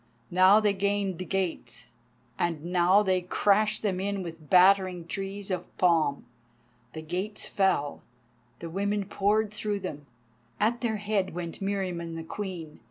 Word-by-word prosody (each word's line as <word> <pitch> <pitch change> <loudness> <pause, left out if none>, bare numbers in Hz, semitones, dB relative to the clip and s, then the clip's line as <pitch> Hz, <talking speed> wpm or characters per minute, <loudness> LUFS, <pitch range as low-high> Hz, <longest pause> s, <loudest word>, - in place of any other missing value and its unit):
Now 185 +4 +6
they 210 -2 +2
gained 200 -2 -1
the 185 - -4
gates, 180 -11 -3 0.5
and 165 -2 -1
now 180 +3 +4
they 185 -2 +1
crashed 210 +4 +2
them 190 -4 0
in 200 0 -2
with 165 -3 -9
battering 185 -1 +5
trees 195 +2 -5
of 180 -1 -5
palm. 165 -5 +2 0.7
The 160 - -7
gates 185 +6 -4
fell, 190 -7 0 0.6
the 165 - -7
women 200 +2 -1
poured 205 +2 +1
through 210 -1 -2
them. 145 -6 -6 0.5
At 230 +3 +1
their 230 -3 0
head 205 -4 -1
went 175 +2 -6
Meriamun 185 -4 -3
the 165 - -5
Queen. 170 -3 -6
190 Hz, 145 wpm, -28 LUFS, 170-205 Hz, 0.7 s, Now